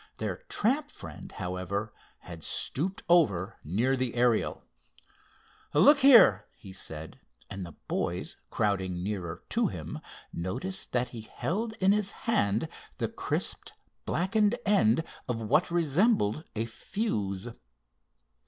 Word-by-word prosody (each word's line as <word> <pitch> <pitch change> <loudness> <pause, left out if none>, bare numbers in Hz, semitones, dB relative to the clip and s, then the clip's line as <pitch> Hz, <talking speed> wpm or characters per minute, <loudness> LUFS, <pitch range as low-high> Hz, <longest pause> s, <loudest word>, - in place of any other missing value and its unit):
Their - - -3
tramp 275 +7 +1
friend, - - -10
however, 95 +4 -3 0.3
had 85 -2 -10
stooped 185 - +1
over 115 - +3
near 115 - +1
the 130 -2 -2
Ariel. 120 -2 +1 1.1
"Look 275 - +7
here," 235 - +7
he 95 -2 -12
said, 80 -4 -7 0.3
and 95 -1 -5
the 85 -3 -8
boys, - - -2
crowding 95 -4 -1
nearer 95 -4 -4
to - - +2
him, - - -6 0.3
noticed 95 - -4
that 125 0 +1
he 120 -2 -7
held 215 - -3
in 195 -2 +3
his 205 -1 +2 0.2
hand 110 - +2 0.3
the - - -1
crisped, - - -3 0.3
blackened 210 +6 +2
end 160 - +4 0.2
of 120 -2 -2
what 150 +12 +2
resembled 165 - +2
a 110 +1 -1
fuse. 110 - -3
120 Hz, 120 wpm, -29 LUFS, -, 1.1 s, Look